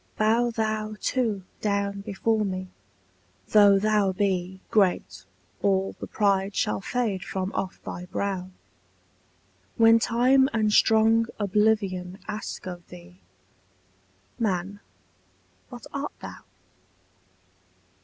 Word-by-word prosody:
Bow 230 +3 +3
thou 215 -1 -2
too 225 -7 -1 0.2
down 200 -1 -1
before 215 +2 0
me: 185 -2 -4 0.8
though 205 -2 +6
thou 210 -1 +2
be 190 -1 -1
Great, 175 - +1 0.4
all 195 -1 +1
the - - -6
pride 200 -1 +1
shall 105 -1 0
fade 220 - -2
from 190 0 -3
off 190 -1 -3
thy 180 - -6
brow, 185 -1 -3 1.3
When 225 -1 +6
Time 255 +4 +3
and 215 -2 +1
strong 225 +1 +4
Oblivion 200 -3 0
ask 210 0 -5
of 175 -2 -8
thee, 90 +1 -13 1.2
Man, 200 -2 -1 0.9
what - - -10
art - - -4
thou? - - -9
200 Hz, 105 wpm, -26 LUFS, 185-220 Hz, 1.3 s, though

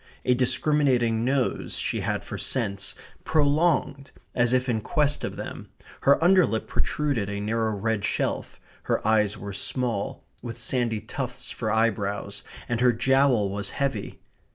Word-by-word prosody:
A 125 - +4
discriminating 125 -3 +2
nose 130 0 0
she - - 0
had - - -2
for - - -6
scents, 100 -6 -2 0.3
prolonged, 150 -2 +2 0.2
as 120 -1 +2
if 130 0 +2
in 115 -3 0
quest 150 +5 +1
of - - -3
them; - - -7 0.3
her 140 - +5
underlip 175 -11 +4
protruded 140 -9 -1
a 100 0 -3
narrow 110 +2 0
red 105 0 -1
shelf; - - -2 0.3
her - - 0
eyes 105 -1 +3
were 100 0 -6
small, 115 0 -2 0.2
with 115 -1 -6
sandy 120 -1 0
tufts 125 +3 -5
for 110 - -3
eyebrows, 100 -3 0 0.2
and 120 0 -1
her 125 -1 +6
jowl 125 -4 +3
was 100 0 -3
heavy. 135 -7 -2
120 Hz, 145 wpm, -26 LUFS, 105-135 Hz, 0.3 s, her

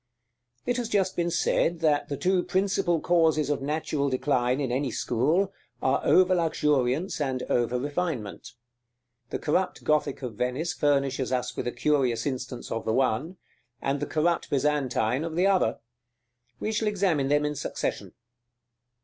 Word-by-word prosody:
§ - - -45
VI. - - 0
It 245 - 0
has 240 -2 -2
just 190 -3 +1
been 175 0 0
said 170 0 +1
that 150 -3 +2
the 140 - -3
two 185 +3 +2
principal 190 -2 +1
causes 160 -4 +2
of 145 - -1
natural 145 0 -1
decline 130 -1 +1
in 135 -4 -1
any 135 +2 0
school, 155 - 0 0.3
are 130 - +1
over 185 0 +5
luxuriance 150 -2 +1
and 130 -3 -1
over 120 0 +1
refinement. 145 - -3 0.8
The - - -2
corrupt 180 +4 -1
Gothic 150 -3 0
of 125 -3 -4
Venice 125 +10 -2
furnishes 140 -3 +1
us 125 -1 -1
with - - -3
a - - 0
curious 125 -3 +1
instance 125 -2 -4
of 115 - -2
the 110 - 0
one, 135 +8 0 0.4
and 140 +1 -1
the 145 - -3
corrupt 170 +2 0
Byzantine 135 -3 +1
of 165 -1 -4
the 180 +3 +2
other. 190 - +2 0.8
We 215 - -2
shall 220 0 0
examine 185 -9 +1
them 145 +1 +2
in 150 - -1
succession. 145 - -4
145 Hz, 160 wpm, -27 LUFS, 130-170 Hz, 0.8 s, over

